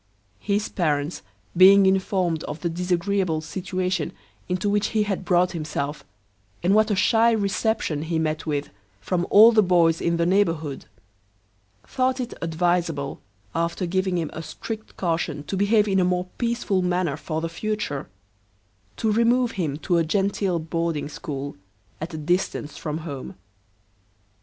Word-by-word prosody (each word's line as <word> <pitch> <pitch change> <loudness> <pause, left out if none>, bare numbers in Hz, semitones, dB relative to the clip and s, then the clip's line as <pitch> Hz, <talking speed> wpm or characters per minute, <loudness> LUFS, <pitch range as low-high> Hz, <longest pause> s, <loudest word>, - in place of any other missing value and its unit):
His 205 +1 0
parents 150 -2 -1 0.3
being 195 +2 +8
informed 185 -4 +1
of 155 - -6
the 170 - -1
disagreeable 180 0 0
situation 185 +3 -3 0.4
into 180 +3 -1
which 205 0 +2
he 210 - +4
had 195 -2 -2
brought 180 0 +3
himself, 150 -3 -4 0.6
and 185 +3 +3
what 215 +1 +4
a 205 - +2
shy 225 +3 +4
reception 200 -6 0
he 160 +1 -2
met 155 0 -2
with 145 -1 -2 0.3
from 175 - -1
all 220 +3 +8
the 220 -2 +5
boys 170 -4 +3
in 170 0 +1
the 170 - +1
neighbourhood, 165 -6 0 1.0
thought 260 0 0
it 250 -1 -4
adviseable, 165 -3 -1 0.3
after 170 +2 -1
giving 185 +1 0
him 165 -3 -2
a 160 - -5
strict 220 +7 -7
caution 165 -4 -1
to 195 - -4
behave 205 +2 +3
in 195 -1 +2
a - - +4
more 180 0 +1
peaceable 235 -5 0
manner 180 -4 0
for 155 +1 -4
the 165 - -2
future, 170 -4 -3 0.9
to 220 - +1
remove 235 +2 +3
him 155 -7 -2
to 175 +2 0
a - - +3
genteel 195 +1 0
boarding 165 -2 -2
school, 140 -1 -6 0.5
at 160 +3 -4
a 160 - -5
distance 155 -2 -1
from 150 -1 -4
home. 140 -5 -6
180 Hz, 150 wpm, -24 LUFS, 160-200 Hz, 1.0 s, being